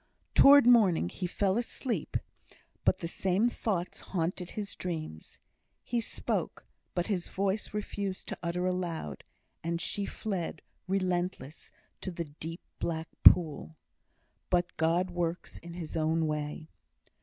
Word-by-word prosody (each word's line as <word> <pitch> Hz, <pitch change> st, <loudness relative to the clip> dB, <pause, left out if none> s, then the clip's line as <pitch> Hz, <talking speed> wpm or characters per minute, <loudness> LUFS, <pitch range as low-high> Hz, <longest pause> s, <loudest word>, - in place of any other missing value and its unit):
Towards 280 Hz, -1 st, +9 dB
morning 205 Hz, -, +5 dB
he 180 Hz, -, -3 dB
fell 195 Hz, +3 st, +1 dB
asleep, 245 Hz, 0 st, -2 dB, 0.7 s
but -, -, +4 dB
the 170 Hz, -, -4 dB
same 190 Hz, +7 st, +1 dB
thoughts 185 Hz, -7 st, -2 dB
haunted 180 Hz, 0 st, -2 dB
his 205 Hz, -2 st, -4 dB
dreams; 155 Hz, -, -5 dB, 0.5 s
he 240 Hz, -1 st, 0 dB
spoke, -, -, -2 dB, 0.3 s
but 175 Hz, -1 st, +1 dB
his 190 Hz, -5 st, -1 dB
voice 200 Hz, +2 st, -1 dB
refused 200 Hz, -2 st, -4 dB
to -, -, -4 dB
utter 175 Hz, +1 st, -1 dB
aloud; 175 Hz, -, -2 dB, 0.4 s
and 170 Hz, 0 st, -1 dB
she 200 Hz, +4 st, -2 dB
fled, 185 Hz, -7 st, -4 dB, 0.2 s
relentless, 180 Hz, -5 st, -1 dB, 0.3 s
to -, -, -3 dB
the 170 Hz, -2 st, -4 dB
deep, 160 Hz, +3 st, -8 dB, 0.2 s
black 165 Hz, -1 st, -2 dB
pool. 150 Hz, -, +6 dB, 0.7 s
But 175 Hz, -1 st, +1 dB
God 170 Hz, +3 st, +2 dB
works 175 Hz, 0 st, -3 dB
in 170 Hz, 0 st, -9 dB
His 170 Hz, -3 st, -6 dB
own 160 Hz, 0 st, +2 dB
way. 150 Hz, +1 st, -3 dB
175 Hz, 130 wpm, -31 LUFS, 165-195 Hz, 0.7 s, Towards